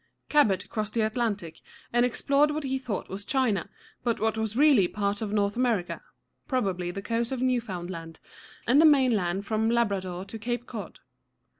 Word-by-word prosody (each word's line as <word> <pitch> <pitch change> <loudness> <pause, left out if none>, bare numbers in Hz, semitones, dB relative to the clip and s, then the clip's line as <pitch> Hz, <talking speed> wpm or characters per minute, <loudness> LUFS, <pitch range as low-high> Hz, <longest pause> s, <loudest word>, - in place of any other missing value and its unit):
Cabot 250 -11 +3
crossed 215 0 -4
the 230 - +2
Atlantic, 215 -8 -2 0.3
and 240 0 +4
explored 280 +4 +2
what 300 +1 -2
he 265 -1 -1
thought 240 -7 -4
was 195 +2 -5
China, 215 - 0 0.3
but 235 -2 0
what 220 0 +1
was 220 0 -2
really 275 -10 +6
part 200 +2 -2
of 215 -2 -3
North 205 -1 +1
America, 235 -8 0 0.5
probably 190 -9 -1
the 195 +3 -5
coast 230 +2 -1
of 260 - -2
New´foŭnd 230 -9 -1
land 165 -2 -8 0.5
and 265 +6 +5
of 320 - +8
the - - +8
mainland 205 -9 +2
from 220 +1 +1
Labrador 195 -6 0
to 220 +2 -8
Cape 240 +2 -3
Cod. 225 -5 -8
220 Hz, 175 wpm, -27 LUFS, 195-250 Hz, 0.5 s, of